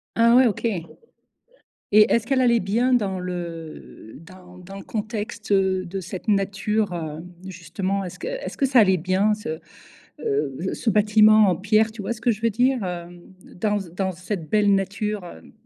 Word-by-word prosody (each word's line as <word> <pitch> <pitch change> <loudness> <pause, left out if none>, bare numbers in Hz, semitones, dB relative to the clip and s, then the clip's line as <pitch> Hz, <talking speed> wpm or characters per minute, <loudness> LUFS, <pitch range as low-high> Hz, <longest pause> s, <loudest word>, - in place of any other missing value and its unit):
Ah 235 +1 +5
ouais, 255 0 +6
OK, 225 +1 -3
et 180 -7 -1 1.1
est-ce 215 +2 +5
qu'elle 265 0 +1
allait 235 -2 +4
bien 230 +6 0
dans 195 -5 0
le 170 -9 -7
dans 180 +1 -15
dans 190 +2 -11
le 195 - -8
contexte, 215 0 -5
heu, 190 -1 +2
de 190 +2 -5
cette 185 +2 -8
nature, 200 0 0
heu, 160 -2 -5 0.3
justement. 190 +3 -3
Est-ce 180 - -8
que - - -6
est-ce - - -5
que 275 - +2
ça 255 -3 +5
allait 190 -3 +4
bien, 185 +5 +1
ce, 160 -6 -6 0.6
heu, 430 -2 -2
ce 230 - -1
bâtiment 215 +1 +5
en 180 - +3
pierre, 215 +4 +2
tu 215 -2 -8
vois 235 - -2
ce 220 - -9
que 235 0 +2
je 215 +2 -8
veux 230 - +2
dire? 245 +2 +1
Hem, 175 -1 -6 0.3
dans 210 +2 0 0.2
dans 190 0 -1
cette 180 -2 -6
belle 205 -2 +3
nature, 200 +1 -2
heu? 175 - -12
200 Hz, 180 wpm, -23 LUFS, 185-220 Hz, 1.1 s, ouais